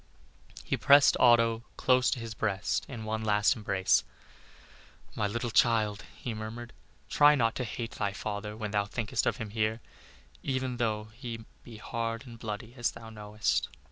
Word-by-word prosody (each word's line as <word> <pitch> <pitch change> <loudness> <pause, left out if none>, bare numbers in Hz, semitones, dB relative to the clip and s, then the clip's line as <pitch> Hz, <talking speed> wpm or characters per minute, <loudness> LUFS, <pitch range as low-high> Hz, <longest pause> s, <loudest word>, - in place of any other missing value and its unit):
He - - -1
pressed 140 0 +6
Otto 115 -2 +5 0.2
close 130 0 +3
to 130 - -1
his 115 -1 -6
breast 105 -2 -1
in 120 -4 -6
one 110 +1 -2
last 105 -1 +3
embrace. 95 -4 +2 1.1
"My 105 - 0
little 115 +3 -3
child," 110 -3 +2
he 120 - -5
murmured, 110 +2 -7 0.3
"try 150 0 +6
not 115 -4 +2
to 125 - -1
hate 115 0 -5
thy 100 -1 -2
father 105 +1 -5
when 110 -2 -4
thou 100 -1 +1
thinkest 105 +1 -1
of - - +1
him 110 -2 -6
hereafter, 110 +1 -1 0.6
even 130 -2 -2
though 110 -2 -1
he 115 -2 -7 0.2
be 115 -2 -11
hard 115 +3 -4
and 115 -2 -11
bloody 110 +1 -6
as 120 -2 0
thou 115 0 -10
knowest." 105 0 -1
115 Hz, 165 wpm, -30 LUFS, 105-120 Hz, 1.1 s, pressed